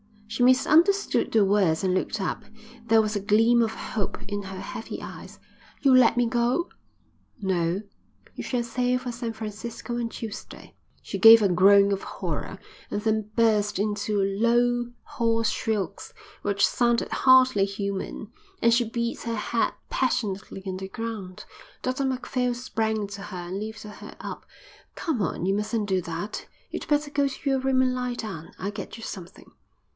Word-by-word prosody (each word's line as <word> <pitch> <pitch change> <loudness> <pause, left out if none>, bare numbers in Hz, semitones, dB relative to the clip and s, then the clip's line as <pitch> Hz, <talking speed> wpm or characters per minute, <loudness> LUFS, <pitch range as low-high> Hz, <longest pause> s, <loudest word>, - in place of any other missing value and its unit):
She 225 +3 -5
misunderstood 325 +10 +4
the 220 -2 +4
words 190 -4 +2
and 185 -1 +2
looked 185 - -1
up. - - -2 0.4
There 225 0 +6
was 215 0 -2
a - - +1
gleam 225 +4 +4
of 225 -1 0
hope 205 -4 -3
in 205 0 -3
her 190 -1 -7
heavy - - -6
eyes. - - -10 0.4
"You'll 270 -3 +6
let 235 -3 +5
me 245 - +4
go?" 240 +8 +1 0.7
"No. 180 -1 0 0.5
You - - -6
shall 245 -2 -1
sail 250 +1 0
for 250 -1 -5
San 235 -1 -4
Francisco 225 +2 -5
on 235 - -1
Tuesday." 225 -2 -8 0.3
She - - -5
gave 225 0 +10
a 200 - +4
groan 200 +3 +6
of 195 -1 -1
horror - - -5 0.3
and 205 - -2
then 215 -1 0
burst 210 -3 +2
into 210 +1 -1
low, 240 +4 +2
hoarse 230 -5 0
shrieks 215 -4 -3 0.3
which 200 0 +3
sounded 240 -1 +1
hardly 260 -6 +5
human, 200 +1 -4 0.3
and 235 - +5
she 235 -1 +2
beat 235 0 -2
her 230 0 -2
head 225 +2 0 0.2
passionately 205 -6 -1
on 190 -1 -3
the 190 0 -6
ground. 210 -3 -6 0.4
Dr 260 +2 -1
Macphail 250 -1 -1
sprang 220 -3 -1
to 200 0 -8
her 180 -4 -7
and 190 +2 -3
lifted 215 0 -7
her - - -11
up. - - -7 0.5
"Come 305 - -2
on, 180 -1 -2
you 195 - +2
mustn't 210 +1 -1
do 190 -1 +2
that. 170 +6 -5 0.2
You'd - - -5
better 295 -1 +1
go 285 -1 +2
to 275 +1 -4
your 270 -1 +2
room 260 0 +2
and 255 -1 +2
lie 250 -1 -2
down. 190 -9 -7
I'll 200 +2 -3
get 205 +1 -7
you 225 - -10
something." 180 -6 -9
220 Hz, 170 wpm, -26 LUFS, 200-245 Hz, 0.7 s, gave